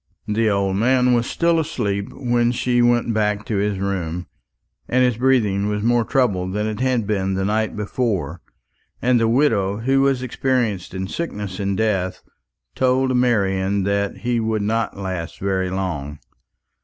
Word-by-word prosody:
The 110 +1 +1
old 100 -1 0
man 125 +3 +3
was 120 0 +1
still 170 -1 +2
asleep 105 -11 -2
when 120 -2 +1
she 120 0 +1
went 120 -1 +2
back 105 -1 0
to 110 - -2
his 100 0 0
room; 90 -3 -3 0.6
but - - -3
his 125 -2 +3
breathing 110 -6 +2
was 105 0 -2
more 120 0 +3
troubled 95 -9 0
than 105 +1 -1
it 110 0 -3
had 125 -3 +1
been 95 -2 -1
the 95 0 -1
night 110 +2 0
before, 100 - -2 0.6
and 125 0 +3
the 115 - +2
widow, 110 -6 +2
who 135 +4 +2
was 135 -2 +2
experienced 120 -7 -1
in 95 0 -3
sickness 105 - -5
and 100 -1 -1
death, 95 -4 -1 0.5
told 130 0 +2
Marian 100 -5 +1
that 100 +1 -1
he 120 -1 0
would 110 -2 -1
not 110 0 -1
last 95 -3 -5
very 95 -1 -1
long. 85 -7 -3
105 Hz, 160 wpm, -21 LUFS, 95-120 Hz, 0.6 s, man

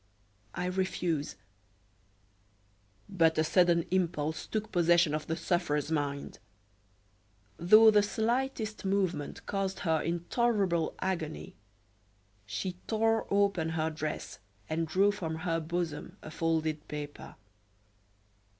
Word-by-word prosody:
"I - - -2
refuse." 180 -4 -1 1.7
But 165 -5 +2
a 155 - +4
sudden 170 0 +3
impulse 160 -4 -1
took 215 0 -3
possession 170 -2 +4
of 155 0 -3
the 160 - -1
sufferer's 160 -4 0
mind. 145 -2 -2 1.2
Though 215 +6 +7
the 210 -1 +5
slightest 220 +1 -1
movement 190 -6 -1
caused 195 -1 -2
her 160 -4 +1
intolerable 175 +1 0
agony, 170 -5 -3 0.9
she 175 - -4
tore 225 0 +1
open 200 -5 +2
her 160 0 -1
dress 155 -1 -5 0.3
and 160 +1 -1
drew 195 +5 +3
from 170 -6 -4
her 165 0 -1
bosom 165 -1 -4
a 155 - -8
folded 160 -1 -1
paper. 150 -1 -7
170 Hz, 105 wpm, -30 LUFS, 160-195 Hz, 1.7 s, Though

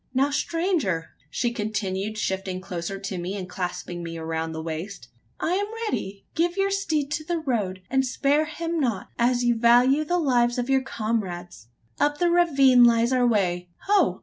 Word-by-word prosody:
Now, 275 +2 +3
stranger!" 295 - -1 0.2
she 235 - -1
continued, 210 -1 -3
shifting 190 -2 -2
closer 185 +1 -5
to 195 -1 -5
me, 185 +4 -4
and 185 -2 -5
clasping 180 -1 -5
me 165 -1 -6
round 160 0 -3
the - - -4
waist, 165 - -6 0.3
"I 335 - 0
am 405 +2 0 0.2
ready. 195 - -4
Give 345 +3 0
your 395 0 +1
steed 315 -8 -1
to 310 - -2
the 345 +2 -1
road; 210 - -2
and 265 +1 +2
spare 280 +4 +1
him 330 +2 -3
not, 230 -9 -1
as 245 +1 +2
you 240 0 +3
value 245 +5 +4
the 350 +4 0
lives 245 -6 +2
of 245 +2 -1
your 265 0 +4
comrades. 205 - -4 0.3
Up 290 0 +2
the 345 +2 +2
ravine 275 -8 +5
lies 235 +1 +4
our 250 -1 +3
way. 180 -5 0 0.2
Ho! 405 0 +3
240 Hz, 175 wpm, -25 LUFS, 185-290 Hz, 0.3 s, ravine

